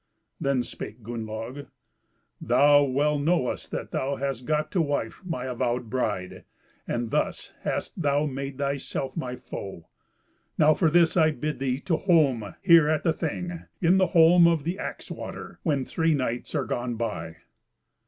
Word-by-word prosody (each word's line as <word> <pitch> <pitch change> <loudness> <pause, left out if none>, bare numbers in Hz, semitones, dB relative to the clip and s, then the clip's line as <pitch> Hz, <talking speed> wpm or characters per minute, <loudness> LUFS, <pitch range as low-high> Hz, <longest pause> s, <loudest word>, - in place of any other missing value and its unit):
Then 140 -3 +1
spake 110 -1 -8
Gunnlaug, 115 +4 -6 0.7
"Thou 145 0 +5
well 145 +2 +1
knowest 150 -3 0
that - - -5
thou 140 +1 -1
hast 135 -3 -3
got 155 +1 0
to 180 - +2
wife 145 -7 -2
my 165 -9 -4
avowed 120 -2 -2
bride, 105 -8 -2 0.4
and 120 -1 -2
thus - - -1
hast - - -3
thou 145 0 +2
made 135 -1 -4
thyself 140 -1 -3
my 125 -6 -3
foe. 95 -8 -8 0.7
Now 155 0 +6
for 165 0 +2
this 170 +1 +4
I 160 -3 +5
bid 150 -1 -3
thee 130 -1 -1
to 165 -4 0
holm 140 - +2
here 170 -5 +7
at 155 -1 +1
the 165 - +2
Thing, 170 +2 -4
in 180 +2 +4
the 185 - +4
holm 170 +1 +6
of 165 -4 +2
the 175 +6 -3
Axe - - -6
water, - - -7
when 145 -7 0
three 160 -1 +1
nights 125 -3 -3
are - - 0
gone 120 0 -2
by." 85 -8 -4
140 Hz, 160 wpm, -26 LUFS, 125-160 Hz, 0.7 s, here